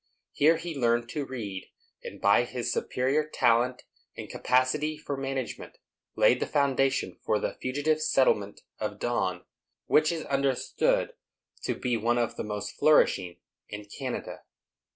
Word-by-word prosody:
Here 160 +3 +4
he 165 0 -5
learned 120 -2 +1
to 145 0 -3
read, 105 -7 -6 0.3
and, - - -8
by 100 +4 +4
his 120 0 -3
superior 135 +4 0
talent 125 -1 +2 0.3
and - - -6
capacity 130 +5 +1
for 145 -2 -4
management, 135 -2 -5 0.4
laid - - +4
the - - -1
foundation 135 -2 +1
for - - +1
the - - -2
fugitive 145 +4 0
settlement 105 -9 +2 0.2
of 105 -1 -3
Dawn, 95 -7 -1 0.4
which 155 +1 +4
is 165 -2 -4
understood 135 -2 0 0.5
to - - -1
be 120 -2 -1
one 120 +2 +1
of 120 -1 0
the - - -4
most 105 -1 -4
flourishing 95 - +3 0.3
in 105 0 -7
Canada. 100 - -6
130 Hz, 140 wpm, -28 LUFS, 115-140 Hz, 0.5 s, Here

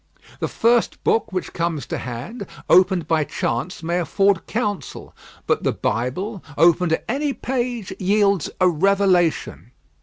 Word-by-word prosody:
The - - -1
first 235 0 +1
book 225 -1 +1
which 185 -1 -4
comes 165 -5 -2
to - - -4
hand, 130 - -6 0.2
opened 185 -3 +4
by 160 -2 +2
chance 145 +5 -3
may 170 +2 0
afford 195 +4 +1
counsel; 210 -4 -4 0.3
but - - +1
the - - 0
Bible, 180 - -2
opened 170 0 +4
at - - -2
any 280 +4 -1
page, 240 -5 -3
yields 200 -3 +2
a 185 - +5
revelation. 175 - +1
185 Hz, 140 wpm, -21 LUFS, 160-210 Hz, 0.3 s, a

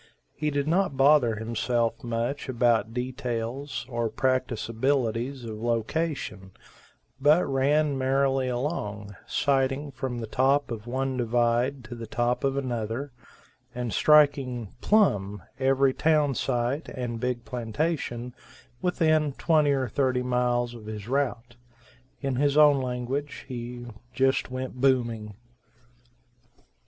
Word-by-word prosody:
He 150 +1 -1
did 145 0 -1
not 175 -3 +1
bother 135 -4 +5
himself 115 +3 -1
much 120 +4 -2
about 120 -3 +2
details 125 +1 -4
or 120 -2 -1
practicabilities 130 0 -1
of 110 -2 -7
location, 115 - -2 0.7
but 150 +5 +5
ran 140 +2 +2
merrily 135 0 +1
along, 110 - -3
sighting 135 +1 0
from 125 -1 -4
the 115 - -4
top 135 +4 +1
of 115 0 -6
one 130 +1 -2
divide 120 +2 +1
to 120 +1 -9
the 115 -1 -7
top 120 +2 0
of 135 0 +1
another, 125 +1 -3 0.6
and 125 -2 -3
striking 140 -7 +3
"plumb" 105 - +2 0.2
every 135 0 +3
town 150 -2 +2
site 125 +4 -1
and 120 -3 -4
big 125 -1 -2
plantation 125 0 -3 0.5
within 155 -5 +2
twenty 155 0 +2
or 135 -2 +1
thirty 130 +1 0
miles 125 -1 0
of 110 -3 -11
his 105 -1 -6
route. 125 -3 -2 0.7
In 135 -2 -1
his 145 +1 +2
own 145 -2 +6
language 130 +3 -4
he 120 -1 -6 0.3
"just 135 0 +2
went 130 0 -5
booming." 115 -6 +1
125 Hz, 120 wpm, -27 LUFS, 120-140 Hz, 0.7 s, own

